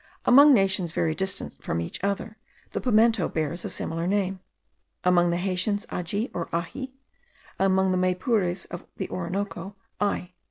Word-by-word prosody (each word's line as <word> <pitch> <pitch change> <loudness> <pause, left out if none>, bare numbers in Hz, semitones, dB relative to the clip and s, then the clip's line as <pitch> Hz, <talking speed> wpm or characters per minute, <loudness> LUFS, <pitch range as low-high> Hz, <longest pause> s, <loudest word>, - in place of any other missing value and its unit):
Among 285 +4 +8
nations 190 - +3
very 160 -2 +1
distant 190 +3 -3
from 85 - -1
each 85 - -5
other, 200 +2 -2 0.4
the - - -3
pimento 225 -4 +3
bears 160 +2 -2
a - - -3
similar 165 +1 -2
name; 195 -1 0 0.6
among 175 -1 +4
the 170 - +1
Haitians 195 +3 -1
aji 200 +7 -2
or 170 - -4
ahi, 180 +11 -4 0.6
among 190 0 +3
the 185 - +1
Maypures 185 0 +1
of - - -7
the - - -3
Orinoco, 190 +1 -4 0.2
ai. 190 -3 -1
190 Hz, 150 wpm, -26 LUFS, 175-205 Hz, 0.6 s, Among